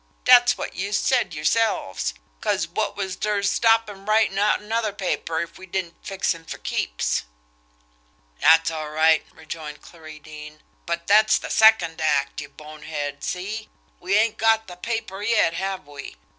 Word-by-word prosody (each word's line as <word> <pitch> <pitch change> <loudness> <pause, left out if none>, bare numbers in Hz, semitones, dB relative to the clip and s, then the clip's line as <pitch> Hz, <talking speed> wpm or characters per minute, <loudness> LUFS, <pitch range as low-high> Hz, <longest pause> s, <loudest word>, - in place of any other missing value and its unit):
Dat's - - +6
wot - - -5
youse 200 +3 -1
said 255 -2 +1
yerselves, 155 - 0 0.3
'cause - - 0
wot - - -3
was 190 -2 -3
ter 210 0 -1
stop 225 +2 +3
him 200 0 -10
writin' 215 -2 +3
out 210 +1 +3
another 220 +1 -2
paper 180 -4 -2
if 170 - -8
we 190 - -11
didn't 175 -2 -5
fix 195 -2 -1
him 165 -1 -13
fer - - -7
keeps?" - - -2 1.2
"That's 165 0 +5
all 155 -1 -5
right," 160 +1 +3
rejoined 155 -2 -9
Clarie 155 -2 -12
Deane; 150 0 -12 0.2
"but 170 0 -3
that's 215 +3 +5
the - - -6
second 200 -8 +4
act, 145 -2 0
you 145 - -9
bonehead, 150 0 -7
see! 210 +4 -4 0.3
We 185 +3 0
ain't 220 0 +2
got 225 0 +3
the 180 - -10
paper 205 0 -4
yet, 210 -5 +2
have 190 0 -4
we? 145 - -10
180 Hz, 160 wpm, -23 LUFS, 155-210 Hz, 1.2 s, Dat's